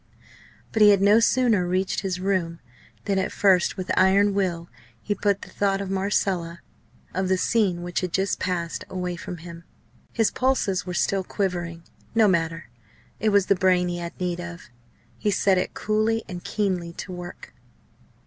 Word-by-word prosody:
But 220 - 0
he 210 - +9
had 200 -2 +5
no 205 +3 +6
sooner 230 -6 +3
reached 185 +1 0
his 185 -2 -3
room 180 -3 -1 0.5
than, 195 -1 +1
at 190 - -1
first 190 -2 +3
with 185 -1 -3
iron 200 +2 +4
will, 175 -4 -1 0.3
he 205 - -2
put 200 0 0
the - - -11
thought 195 -1 0
of 195 -1 -4
Marcella, 190 -3 -1 0.5
of 190 0 -1
the 190 - +3
scene 185 -4 +1
which 175 0 -2
had 180 -2 -3
just 190 +2 0
passed, 175 -2 -2
away 180 -1 -3
from 175 +1 -7
him. 170 0 -10 0.5
His 225 -2 +1
pulses 235 -9 0
were 180 - -4
still 195 +1 +1
quivering. 175 -4 -3 0.3
No 225 -2 +5
matter! 165 -6 -1 0.5
It 220 - +2
was 200 -2 +4
the - - +4
brain 180 -1 +2
he 175 0 -3
had 170 0 -7
need 180 -1 -2
of. 170 -8 -9 0.5
He 210 - 0
set 195 -2 +3
it 180 - -3
coolly 215 +1 0
and 180 -3 -7
keenly 185 -5 -2
to 185 - -7
work. 180 0 -9
185 Hz, 175 wpm, -24 LUFS, 175-200 Hz, 0.5 s, he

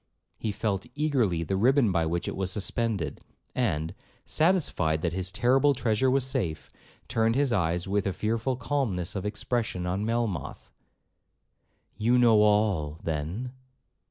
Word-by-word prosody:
He 110 - -2
felt 100 -2 -2
eagerly 125 - +1
the 95 +4 -2
ribbon 120 +2 +3
by 85 -3 +1
which 85 +1 -2
it - - -3
was 95 -1 -2
suspended, 105 -3 -1 0.3
and, 80 +2 -1 0.3
satisfied 155 - +1
that 85 -1 0
his 95 0 -2
terrible 135 +5 +3
treasure 120 0 +1
was 130 0 +2
safe, 105 - -2 0.4
turned 115 0 +1
his 140 -3 +2
eyes 90 -3 0
with 100 0 0
a - - +1
fearful 115 +5 -1
calmness 115 -9 -2
of 100 +1 -2
expression 105 -3 -2
on 95 +3 -1
Melmoth, 115 -5 -3 1.3
'You 120 +3 +3
know 115 -3 +5
all, 105 -8 +2
then?' 85 +11 -3
105 Hz, 140 wpm, -27 LUFS, 90-125 Hz, 1.3 s, know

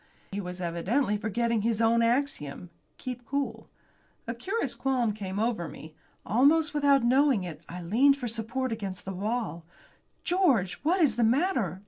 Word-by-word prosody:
He 200 +1 -3
was 180 -1 -7
evidently 190 +8 0
forgetting 225 +2 0
his 225 0 0
own 230 +1 +4
axiom 230 - -1 0.3
keep 250 -1 -6
cool. 280 +3 -3 0.6
A 230 - -3
curious 385 - -2
qualm 250 -5 0
came 195 -2 -5
over 215 -6 0
me. 155 0 -11 0.3
Almost 295 - +3
without 285 -3 +4
knowing 260 -3 +3
it 160 -4 -7
I 180 +1 -7
leaned 260 +11 +4
for 250 -3 -4
support 235 +3 -2
against 200 -4 -5
the 195 - -4
wall. 210 -2 -3 0.6
"George! 300 - +2
What 350 +5 +2
is 255 -8 +3
the 240 - +3
matter? 230 - +1
230 Hz, 155 wpm, -28 LUFS, 195-270 Hz, 0.6 s, own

